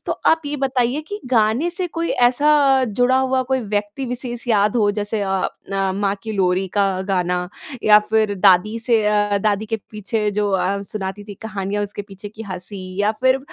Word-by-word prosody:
तो - - 0
आप 320 0 +4
ये 295 +1 -3
बताइए 260 0 0
कि 410 0 -5
गाने 240 +6 +2
से 360 +1 -3
कोई 335 0 -1 0.2
ऐसा 290 +4 +2 0.3
जुड़ा 245 +4 +2
हुआ 260 0 +1
कोई 260 - +2
व्यक्ति 205 +4 -3
विशेष 245 0 -5
याद 210 0 +3
हो 210 -3 +3
जैसे 205 +1 -2
अ, 190 -1 0 0.4
माँ 200 0 0
की 220 - -5
लोरी 190 -1 +1
का 195 -1 +3 0.2
गाना 180 -1 0 0.3
या 210 0 +7
फिर 215 -2 +2
दादी 195 +3 +4
से 225 -2 +2
अ, 205 -1 +2
दादी 210 +1 0
के 225 - -1
पीछे 210 0 -2
जो 205 0 0
अ, 190 0 +1
उम, 200 - -5
सुनाती 200 0 -5
थी 205 -1 -9
कहानियाँ 205 -1 -3
उसके 205 0 -5
पीछे 200 0 -10
की 220 +2 -10
हँसी 185 0 -7 0.2
या 205 +1 +3
फिर 260 +1 +3
210 Hz, 190 wpm, -20 LUFS, 200-245 Hz, 0.4 s, या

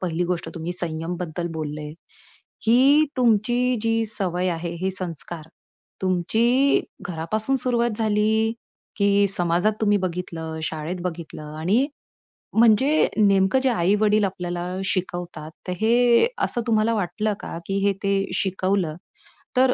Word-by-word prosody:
पहिली 175 -1 -1
गोष्ट 175 - -2
तुम्ही 170 +1 -4
संयम 170 0 -4
बद्दल 175 0 -4
बोलले. 150 0 -5 0.7
की 275 +7 +5
तुमची 245 +1 +2
जी 225 0 +1
सवय 185 -4 -1
आहे, 170 0 -4
हे 190 - +1
संस्कार, 170 -3 -6 0.5
तुमची 230 +9 +2 0.2
घरापासून 215 +9 0
सुरुवात 240 -2 0
झाली? 220 +1 +2 0.4
की 200 0 +3
समाजात 180 +3 +2
तुम्ही 205 -1 +3
बघितलं, 170 -3 -4
शाळेत 160 +3 -4
बघितलं 160 -3 -6
आणि 210 - +2 0.7
म्हणजे 255 +7 +4
नेमकं 200 +3 +4
जे 265 - +1
आई-वडील 210 0 +2
आपल्याला 175 -2 -4 0.2
शिकवतात, 175 -4 -3 0.2
तर 180 - -1
हे 240 - +4 0.2
असं 240 - 0
तुम्हाला 220 0 +2
वाटलं 210 +2 -1
का - - -6
की 195 0 -1
हे 200 - +3
ते 200 0 +2 0.2
शिकवलं, 190 -4 0 0.6
तर 255 0 +5
195 Hz, 125 wpm, -23 LUFS, 175-225 Hz, 0.7 s, की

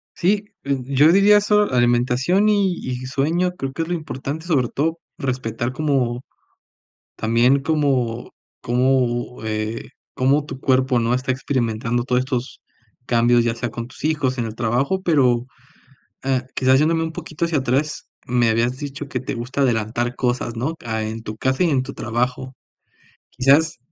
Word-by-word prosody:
Sí, 200 +3 +1 0.2
eh, 140 -1 0
yo 140 +4 +5
diría 200 +3 +6
solo 210 -2 +2
alimentación 125 - +2
y 200 -3 +2
y 125 0 -4
sueño 160 +7 0
creo 135 0 -3
que 165 - -2
es 160 - -7
lo 175 - -2
importante, 155 -1 -5
sobre 140 -8 +2
todo 160 +7 -1 0.2
respetar 125 -2 -2
como, 130 -5 0 0.9
también 120 +5 +3
como 135 -6 0 0.3
como, 125 -1 0
eh, 110 +1 -3 0.2
como 140 +3 +2
tu 135 -2 -8
cuerpo, 130 -1 +2
¿no?, 115 +1 +1
está 130 +1 -1
experimentando 120 -3 -1
todo 125 0 +1
estos 130 -1 -3 0.5
cambios, 120 0 +4
ya 115 -1 0
sea 120 +1 -3
con 115 0 -6
tus 130 - -14
hijos, 145 -4 0
en 120 - -1
el 110 - -5
trabajo, 125 +11 0
pero, 130 -8 +2 0.8
eh, 130 -2 0
quizás 130 0 +4
yéndome 165 +2 +2
un 160 - -3
poquito 160 -1 -6
hacia 165 -2 +1
atrás, 135 +3 -1 0.2
me 120 -1 +2
habías 120 +3 +1
dicho 145 0 -6
que 125 - -2
te 130 - -4
gusta 125 +3 -3
adelantar 120 0 0
cosas, 120 -2 -1
¿no?, 135 +8 -2
ah, 110 -1 -2
en 110 +1 -5
tu 110 - -6
casa 130 +8 0
y 175 - +3
en 130 -3 +2
tu - - -7
trabajo, 125 +3 -2 0.8
quizás 140 +5 +3
130 Hz, 165 wpm, -21 LUFS, 120-150 Hz, 0.9 s, diría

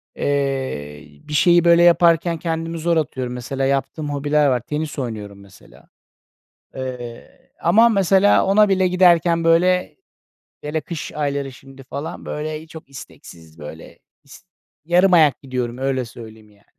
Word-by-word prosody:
Eee, 130 - -3 0.2
bir 150 - -7
şeyi 175 +3 +4
böyle 170 0 +5
yaparken 170 -1 +3
kendimi 165 0 -4
zor 165 +1 0
atıyorum, 130 -5 -3
mesela 130 +2 -4
yaptığım 140 +3 -2
hobiler 145 +1 +1
var, 125 -2 +1
tenis 150 +5 -5
oynuyorum 105 -5 -6
mesela. 100 -1 -19 0.9
Eee, 125 -3 -9
ama 220 +8 +5
mesela 195 -1 +3
ona 205 +2 +4
bile 190 -1 +2
giderken 175 -2 +3
böyle, 180 +2 +2 0.7
hele 150 +2 -3
kış 160 +1 -7
ayları 140 -2 -3
şimdi, 135 +1 -15
falan, 140 +4 -7
böyle, 155 0 -5
eee, 160 - -14
çok 160 -3 -13
isteksiz, 80 - -14
böyle, 80 +2 -11 0.3
is 140 - -16 0.4
yarım 180 +3 +3
ayak 155 -5 +4
gidiyorum 125 -2 -4
öyle 135 -1 -1
söyleyeyim, 110 -2 -13
yani. 100 0 -26
145 Hz, 140 wpm, -20 LUFS, 125-170 Hz, 0.9 s, böyle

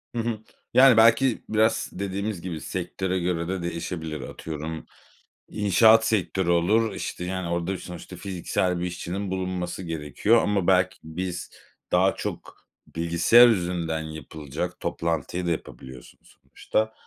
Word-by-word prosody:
Hı - - -1
hı. 115 -2 -2 0.3
Yani 130 -3 +7
belki 115 +2 +5
biraz 110 +1 +2
dediğimiz 100 0 -3
gibi 85 -4 -5
sektöre 95 +1 -3
göre 85 -1 -1
de 95 -1 -3
değişebilir. 85 -2 -4
Atıyorum 80 0 -6 0.6
inşaat 110 +2 +5
sektörü 95 -4 0
olur, 105 +7 +2
işte 90 - -5
yani 95 -1 -3
orada 85 +2 -2
sonuçta 90 +1 -9
fiziksel 90 -1 -2
bir 90 - -2
işçinin 90 +2 -4
bulunması 95 -1 -3
gerekiyor 80 - +1
ama 100 -3 0
belki 90 -1 +3
biz, 90 +2 -5 0.4
daha 95 +2 +3
çok - - -7 0.3
bilgisayar 85 +9 +6
üzerinden 85 -6 0
yapılacak, 80 -2 -6
toplantıyı 85 +2 -2
da 85 - 0
yapabiliyorsunuz 65 -5 -9
sonuçta. 110 0 -2
90 Hz, 125 wpm, -25 LUFS, 85-100 Hz, 0.6 s, Yani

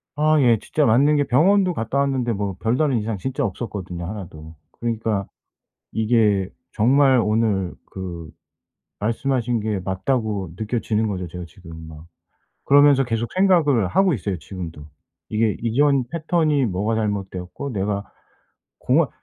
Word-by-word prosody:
아 155 +1 +3
예 120 -3 +5
진짜 150 +6 0
맞는 140 +7 +4
게 145 - +3
병원도 180 +8 +3
갔다 130 +2 -2
왔는데 130 -4 0
뭐 100 -2 -3
별다른 125 +4 +1
이상 110 0 -3
진짜 130 +7 -3
없었거든요 95 -4 -5
하나도. 85 -6 -8 0.2
그러니까 110 -4 -1 0.7
이게 110 -4 +2 0.2
정말 130 +4 +4
오늘 105 -4 0 0.2
그 85 -4 -7 0.7
말씀하신 120 +1 -1
게 105 -1 -1
맞다고 100 0 -2
느껴지는 110 0 -1
거죠 95 -3 -3
제가 90 +1 -7
지금 80 -1 -12
막. 80 0 -12 0.6
그러면서 140 -1 +5
계속 115 -1 -3
생각을 165 - +3
하고 190 - +3
있어요 100 -5 -3
지금도. 85 -4 -8 0.5
이게 110 -1 +1
이전 135 +3 +2
패턴이 155 -4 +1
뭐가 105 +3 -1
잘못되었고 100 +3 -3
내가 100 -2 -2 0.7
공원 - - +2
110 Hz, 300 characters per minute, -22 LUFS, 95-135 Hz, 0.7 s, 예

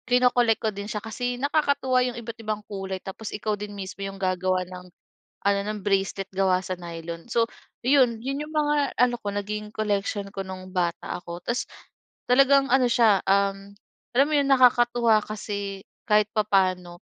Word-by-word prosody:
kino-collect 245 -2 +4
ko 220 - +1
din 200 +1 -6
siya 210 - -2
kasi 245 +2 -3
nakakatuwa 280 -3 +2
'yong 245 -1 -3
iba't 230 0 -8
ibang 215 -1 -3
kulay 195 -2 -5
tapos 200 +3 -7
ikaw 210 0 -1
din 210 0 -6
mismo 195 0 -7
'yong 195 0 -6
gagawa 185 0 0
ng 180 0 -10 0.6
ano 200 0 +4
ng 210 0 -3
bracelet 195 -1 0
gawa 190 -1 +3
sa 185 - -3
nylon. 170 0 -7
So 230 -1 +3 0.4
'yon, 255 -5 +4
iyon 275 +3 -3
yung 310 - -12
mga 295 -2 +1
ano 245 0 +4
ko, 205 - -2
naging 210 +1 -4
collection 205 -1 -1
ko 195 - -3
nung 185 0 -8
bata 175 -2 -1
ako 170 0 -7
tapos 240 +1 0 0.6
talagang 275 +2 +5
ano 260 -1 +5
siya, 220 -5 +4
um, 195 0 +1 0.4
alam 275 +3 +5
mo - - -4
'yong 280 -1 +2
nakakatuwa 240 -3 +5
kasi 200 -2 -5 0.3
kahit 210 0 +4
papaano 185 -4 +1
210 Hz, 170 wpm, -25 LUFS, 195-245 Hz, 0.6 s, talagang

